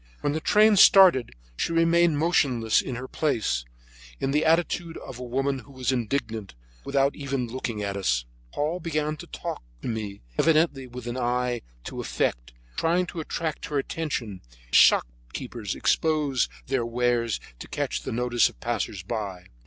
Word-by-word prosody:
When 145 Hz, -, 0 dB
the 155 Hz, -, -2 dB
train 210 Hz, +4 st, +5 dB
started 180 Hz, -, +7 dB, 0.2 s
she 165 Hz, -, -1 dB
remained 165 Hz, -1 st, +4 dB
motionless 130 Hz, -9 st, +2 dB
in 130 Hz, -, -5 dB
her 130 Hz, +2 st, -6 dB
place, 110 Hz, -, 0 dB, 0.5 s
in 135 Hz, -, -1 dB
the 150 Hz, +2 st, +2 dB
attitude 165 Hz, +1 st, +1 dB
of 125 Hz, -2 st, -9 dB
a -, -, -5 dB
woman 135 Hz, +2 st, -1 dB
who 140 Hz, -, -15 dB
was 130 Hz, -1 st, -1 dB
indignant, 115 Hz, -, -2 dB, 0.3 s
without 140 Hz, 0 st, +1 dB
even 135 Hz, -3 st, -2 dB
looking 115 Hz, -3 st, -4 dB
at 100 Hz, -1 st, -2 dB
us. 60 Hz, -11 st, 0 dB, 0.3 s
Paul 155 Hz, +5 st, -1 dB
began 155 Hz, -2 st, -1 dB
to -, -, -10 dB
talk -, -, -5 dB, 0.2 s
to -, -, -3 dB
me, 105 Hz, -, -4 dB, 0.2 s
evidently 155 Hz, -5 st, +3 dB
with 125 Hz, -1 st, -9 dB
an 120 Hz, +1 st, -4 dB
eye 125 Hz, 0 st, 0 dB, 0.2 s
to -, -, -5 dB
effect, -, -, -2 dB, 0.2 s
trying 175 Hz, +2 st, +2 dB
to 170 Hz, -, -7 dB
attract 160 Hz, -1 st, -3 dB
her 150 Hz, -, -2 dB
attention, 135 Hz, -, -3 dB, 0.3 s
as -, -, 0 dB
shopkeepers -, -, +2 dB
expose 150 Hz, -5 st, +1 dB, 0.2 s
their 130 Hz, -1 st, 0 dB
choice 115 Hz, 0 st, -4 dB
wares 120 Hz, -2 st, +1 dB, 0.2 s
to -, -, -8 dB
catch -, -, -2 dB
the -, -, -5 dB
notice 120 Hz, 0 st, +2 dB
of -, -, -19 dB
passersby. 100 Hz, -4 st, -3 dB
130 Hz, 160 wpm, -26 LUFS, 115-155 Hz, 0.5 s, started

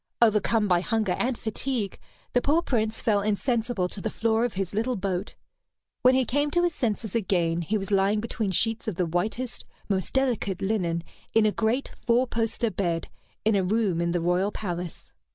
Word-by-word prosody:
Overcome 215 Hz, -1 st, +3 dB
by 175 Hz, -2 st, +3 dB
hunger 215 Hz, 0 st, 0 dB
and 245 Hz, -1 st, 0 dB
fatigue, 220 Hz, -2 st, -2 dB, 0.3 s
the 245 Hz, -, +3 dB
poor 315 Hz, +6 st, +2 dB
Prince 220 Hz, -5 st, 0 dB
fell 210 Hz, -4 st, +2 dB
insensible 220 Hz, -1 st, 0 dB
to 195 Hz, -, -6 dB
the 220 Hz, -, -1 dB
floor 225 Hz, +1 st, +1 dB
of 240 Hz, -, -3 dB
his 190 Hz, -1 st, -2 dB
little 230 Hz, +5 st, 0 dB
boat. 190 Hz, -1 st, -3 dB, 0.7 s
When 255 Hz, +1 st, +6 dB
he 260 Hz, -1 st, +3 dB
came 290 Hz, +5 st, +1 dB
to 345 Hz, +4 st, +2 dB
his 350 Hz, -1 st, +2 dB
senses 220 Hz, -5 st, -2 dB
again, 175 Hz, -6 st, +1 dB
he 210 Hz, +6 st, 0 dB
was 195 Hz, 0 st, -5 dB
lying 200 Hz, +2 st, +3 dB
between 220 Hz, -1 st, -2 dB
sheets 225 Hz, +5 st, +1 dB
of 215 Hz, -, -1 dB
the 180 Hz, -, +1 dB
whitest, 215 Hz, +9 st, -2 dB, 0.3 s
most 190 Hz, -2 st, 0 dB
delicate 240 Hz, -8 st, 0 dB
linen 180 Hz, -5 st, 0 dB, 0.3 s
in 225 Hz, -1 st, +5 dB
a 215 Hz, -, +4 dB
great 230 Hz, +6 st, 0 dB
four 245 Hz, +1 st, +3 dB
poster 230 Hz, -1 st, -1 dB
bed, 170 Hz, -5 st, -1 dB, 0.4 s
in 220 Hz, -, +4 dB
a 195 Hz, -, +2 dB
room 195 Hz, -3 st, +1 dB
in 170 Hz, 0 st, +1 dB
the 175 Hz, 0 st, 0 dB
royal 180 Hz, +4 st, +1 dB
palace. 175 Hz, -5 st, -5 dB
215 Hz, 190 wpm, -26 LUFS, 190-235 Hz, 0.7 s, When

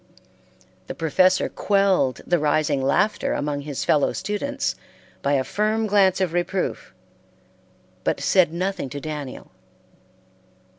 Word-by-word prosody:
The -, -, -6 dB
professor 185 Hz, +4 st, +2 dB
quelled 195 Hz, -10 st, +1 dB
the 175 Hz, -1 st, +2 dB
rising 150 Hz, -1 st, +1 dB
laughter 205 Hz, +11 st, +1 dB
among 145 Hz, -1 st, -2 dB
his 145 Hz, -2 st, -4 dB
fellow 145 Hz, -2 st, +2 dB
students 280 Hz, +7 st, -2 dB, 0.5 s
by 140 Hz, -, +1 dB
a 135 Hz, -2 st, +2 dB
firm 215 Hz, +6 st, 0 dB
glance 195 Hz, -3 st, +3 dB
of 185 Hz, -3 st, 0 dB
reproof, 175 Hz, +2 st, -2 dB, 1.1 s
but -, -, 0 dB
said 185 Hz, -5 st, +3 dB
nothing 185 Hz, -3 st, -3 dB
to 145 Hz, -, -6 dB
Daniel. 150 Hz, -3 st, -7 dB
175 Hz, 115 wpm, -23 LUFS, 145-195 Hz, 1.1 s, glance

